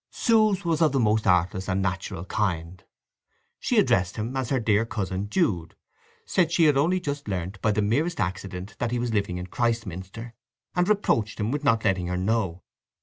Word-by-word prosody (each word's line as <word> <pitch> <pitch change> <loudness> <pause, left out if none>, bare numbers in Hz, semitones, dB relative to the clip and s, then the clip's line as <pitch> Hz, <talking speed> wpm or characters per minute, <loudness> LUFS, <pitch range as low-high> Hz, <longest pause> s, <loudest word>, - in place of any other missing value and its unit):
Sue's 215 -5 +2
was 165 -1 +1
of 155 -4 +4
the 135 - +2
most 110 -1 +2
artless 90 +2 +2
and 95 +1 +1
natural 95 -2 -3
kind. 90 -4 -2 0.8
She - - 0
addressed 90 0 +3
him 115 +4 -4
as 130 -3 -2
her 135 - +1
dear 110 -1 +2
cousin 100 -3 -3
Jude; 100 - 0 0.5
said 175 -3 +1
she 170 -1 +3
had 150 -3 +5
only 170 +7 +2
just 145 -6 -4
learnt 95 0 -4
by 110 - +2
the 105 0 +1
merest 145 +11 0
accident 95 +1 -4
that 120 - 0
he 120 - -1
was 120 -1 -2
living 100 -4 0
in 90 - -5
Christminster, 115 0 -3 0.4
and 180 +1 +2
reproached 115 - +1
him 105 +2 -1
with 145 +1 -2
not 115 -6 +2
letting 95 -2 +1
her 90 0 -2
know. 95 -2 -1
110 Hz, 190 wpm, -26 LUFS, 95-140 Hz, 0.8 s, had